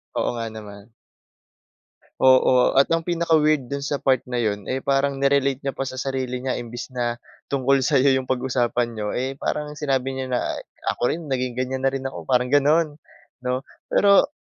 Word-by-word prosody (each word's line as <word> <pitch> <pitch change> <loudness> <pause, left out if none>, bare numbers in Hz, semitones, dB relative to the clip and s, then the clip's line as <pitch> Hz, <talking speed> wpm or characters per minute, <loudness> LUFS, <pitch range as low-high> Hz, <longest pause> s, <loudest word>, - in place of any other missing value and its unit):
Oo - - 0
nga 115 -1 -3
naman. 105 0 -11 1.3
Oo 130 -1 +5
at 135 +4 +4
ang 165 0 0
pinaka 170 -2 +2
weird 150 -4 +1
dun 140 - -2
sa 145 +1 -2
part 130 -2 +2
na 125 -1 -3
yun, 105 -3 -2
eh, 130 +1 -2
parang 140 0 +1
ni-relate 140 -1 +2
niya 135 - -1
pa 135 - -3
sa 130 - -6
sarili 130 -1 -3
niya. 130 - -1
Imbis 120 +2 -7
na 120 -1 -1 0.3
tungkol 135 0 +2
sayo 135 +1 +3
yung 130 -1 0
pag-usapan 125 -2 0
niyo, 105 -2 -4
eh, 135 +2 -3
parang 150 0 -2
sinabi 135 -2 0
niya 130 0 -4
na 125 - +1 0.5
ako - - -10
rin 170 - -5
naging 125 -2 -1
ganyan 130 +1 -2
na - - +2
rin 135 - -3
ako 135 - -5
parang 125 0 +2
ganun, 150 +2 +3 0.4
'no. 125 +2 -2 0.2
Pero 200 -1 +5
130 Hz, 185 wpm, -23 LUFS, 125-140 Hz, 1.3 s, Oo